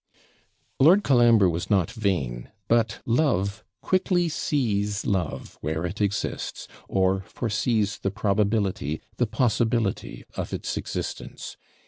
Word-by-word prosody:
Lord 180 +9 +6
Colambre 120 -6 +5
was 85 0 -2
not 100 0 +2
vain; 85 - -2 0.2
but 115 -2 +2
love 110 - +1 0.2
quickly 180 -2 +1
sees 105 -10 -1
love 90 -6 -2
where 80 +3 -2
it 95 +5 -4
exists, 100 0 -2 0.2
or 95 0 +2
foresees 105 -1 0
the 95 - -1
probability, 100 -6 0 0.2
the - - +2
possibility 115 -3 0
of - - -4
its - - -4
existence. - - -5
105 Hz, 110 wpm, -25 LUFS, 95-120 Hz, 0.2 s, Lord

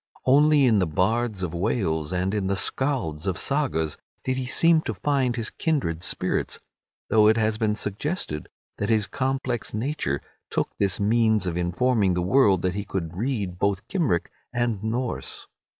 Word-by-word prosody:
Only 145 +2 +5
in 110 -5 +4
the 90 - +1
bards 105 +5 0
of 85 -2 -3
Wales 85 -4 -1
and 90 +2 -1
in 100 -3 -1
the 100 - +1
Scalds 100 - 0
of 95 - 0
the - - -4
Sagas 130 - 0 0.2
did 130 - 0
he 130 -1 -3
seem 165 +4 +4
to 110 - -4
find 130 +3 0
his 115 -2 -3
kindred 130 - -1
spirits, 90 - -1 0.5
though 105 -1 +6
it 110 +1 +4
has 110 -1 +1
been 105 -2 +1
suggested 105 - -3 0.3
that 105 - -1
his 110 -2 +3
complex 130 -2 -2
nature 110 - -1 0.3
took - - -1
this 95 -3 +1
means 110 0 +2
of 90 -2 -2
informing 95 +3 +1
the 90 - 0
world 95 -3 +4
that 90 -1 +1
he 100 +1 -3
could 90 -5 -4
read 100 -5 -2
both 100 -1 0
Cymric 150 - 0 0.2
and 120 -4 -1
Norse. 120 +3 -3
105 Hz, 170 wpm, -25 LUFS, 90-130 Hz, 0.5 s, though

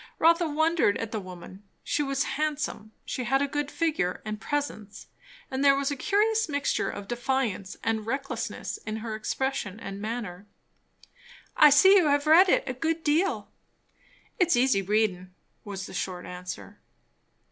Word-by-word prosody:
Rotha 335 +1 +4
wondered 315 -7 +2
at 225 -1 -5
the 220 - -2
woman. 185 0 -10 0.2
She 295 - 0
was 275 -1 0
handsome, 295 -7 -3
she 255 - -3
had 270 +3 +2
a 285 - +1
good 290 0 -2
figure 305 - -1
and 215 0 -5
presence; 280 -8 -4 0.5
but 265 0 -2
there 280 -1 +6
was 280 +1 -1
a - - -1
curious 430 +6 +1
mixture 285 -1 0
of 200 -1 -7
defiance 240 -5 -2
and 220 -1 0
recklessness 270 +5 -4
in 215 0 -5
her 220 - -3
expression 220 -2 -3
and 195 -2 -7
manner. 210 -4 -5 1.1
"I 300 - +8
see 380 +8 +7
you 350 -5 +4
have 285 0 +2
read 340 +5 +7
it - - +3
a 255 - -3
good 325 +5 -2
deal." 320 +6 +1 0.9
"It's 350 -2 +4
easy 245 -5 +3
readin'," 190 -3 0 0.3
was 195 -2 -6
the - - -10
short 180 -2 -4
answer. 180 +3 -8
265 Hz, 160 wpm, -27 LUFS, 205-300 Hz, 1.1 s, I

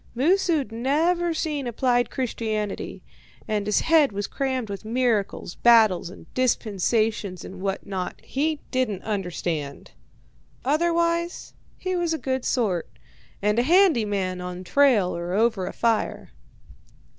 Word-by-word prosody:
Moosu'd 320 - +2
never 320 +9 +1
seen 300 -5 -2
applied 245 +1 +1
Christianity, 220 - -3 0.4
and 210 -1 -1
his 210 - +2
head 315 -5 +4
was 205 0 -3
crammed 260 -2 -2
with 200 0 -6
miracles, 225 -6 0
battles, 220 -7 +4
and 185 - -12
dispensations, 215 -4 0
and 185 -1 -9
what 195 0 -2
not 190 -2 -4
he 300 +2 -1
didn't 250 -8 -1
understand. 175 -8 -3 0.7
Otherwise 335 +3 0 0.2
he 370 0 -2
was 340 -2 0
a - - -3
good 260 -3 -2
sort, 200 -9 0 0.5
and 210 +2 +2
a - - +5
handy 340 - +4
man 190 -3 -2
on 180 0 -6
trail 225 -4 +3
or 170 +1 -4
over 215 -3 +1
a - - -3
fire. 230 -2 -1
230 Hz, 130 wpm, -24 LUFS, 200-285 Hz, 0.7 s, a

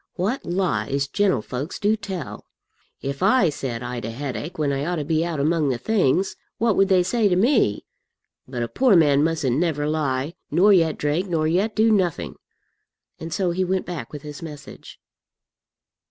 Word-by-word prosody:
"What 205 +9 -1
lies 140 - -1
gentlefolks 145 - -1
do 210 +1 +2
tell! 195 - -7 0.6
If 140 +2 -4
I 195 -1 +4
said 125 -5 -4
I'd 120 -1 -5
a 110 - -3
headache 145 +7 -5
when 150 -2 0
I 135 +1 -2
ought 175 +3 -1
to 150 -3 -3
be 160 +1 +1
out 170 -3 -3
among 155 0 +1
the 125 - 0
things, 190 - +1 0.2
what 225 -3 +2
would 195 - +4
they 185 -2 +4
say 220 +4 +1
to 180 - +2
me? 220 - +2 0.6
But 125 -2 -3
a - - -2
poor 250 - +3
man 145 -4 +4
mustn't 155 -6 0
never 155 -4 0
lie, 150 -1 -1 0.2
nor 200 +4 +5
yet 165 -4 +3
drink, 155 +6 -1
nor 160 -2 +1
yet 195 +7 0
do 225 +1 +4
nothing." 185 -6 0 0.9
And 165 +1 -7
so 180 +1 0
he 185 +2 0
went 185 0 -1
back 160 -10 -6
with 145 -2 -8
his 150 +1 -8
message. 150 -3 -10
165 Hz, 180 wpm, -23 LUFS, 140-190 Hz, 0.9 s, nor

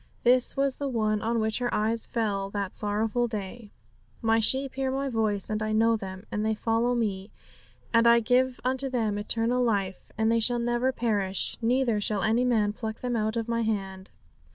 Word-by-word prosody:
This 250 +2 +5
was 275 -1 0
the 285 - -3
one 215 -4 0
on 230 +1 0
which 220 +1 -1
her 245 -1 -1
eyes 220 +2 +1
fell 200 -4 -2
that 200 -2 -4
sorrowful 220 +3 -1
day 210 0 -6 0.5
'My 225 0 +3
sheep 265 +4 +2
hear 265 0 -2
My 270 +1 -2
voice, 215 -4 0
and 215 0 -2
I 215 0 -1
know 225 +1 +3
them, 190 -1 -7
and 210 - -2
they 220 0 0
follow 230 +3 0
Me; 200 -4 -2 0.6
and 230 0 +5
I 235 0 +6
give 250 +2 +1
unto 260 +2 -1
them 220 -5 -1
eternal 230 +4 0
life; 200 -5 -2
and 220 0 +2
they 230 - +3
shall 240 +2 +3
never 240 +2 0
perish, 205 -6 -1
neither 235 -2 +1
shall 205 -1 -1
any 225 +3 +2
man 220 -4 +1
pluck 220 0 -6
them 245 -1 -2
out 220 0 -1
of 230 0 -2
My 230 0 -1
hand.' 195 -4 -3
225 Hz, 195 wpm, -27 LUFS, 210-245 Hz, 0.6 s, I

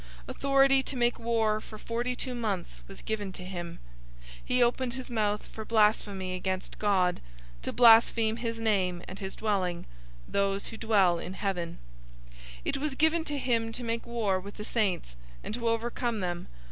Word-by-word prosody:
Authority 275 -1 +4
to 265 - -4
make 240 0 +2
war 225 -2 +1
for 215 - -10
forty 240 +3 -2
two 255 0 -3
months 210 -7 -3
was 195 - -11
given 210 -3 -2
to 180 - -8
him. 175 -2 -6 0.4
013:006 - - -17 0.2
He 250 0 +3
opened 240 +1 +1
his 260 -1 -7
mouth 210 -2 0
for 220 - -8
blasphemy 210 -4 +2
against 185 0 -3
God, 190 -4 +2 0.4
to - - -3
blaspheme 225 -1 +6
his 230 -1 -3
name, 185 -6 +1
and 190 - -8
his 190 -1 -5
dwelling, 185 -5 -1 0.4
those 200 0 0
who 225 - -8
dwell 195 -7 +3
in 185 - -6
heaven. 180 -5 -2 0.5
013:007 - - -19 0.3
It - - 0
was 285 0 -2
given 320 +3 +3
to 295 -2 -2
him 230 -4 0
to 245 +2 -6
make 230 0 -2
war 215 -5 0
with 200 +2 -10
the 210 - -5
saints, 190 - 0 0.3
and - - -5
to 235 0 -2
overcome 230 0 -1
them. 175 -1 -3
220 Hz, 175 wpm, -29 LUFS, 190-235 Hz, 0.5 s, blaspheme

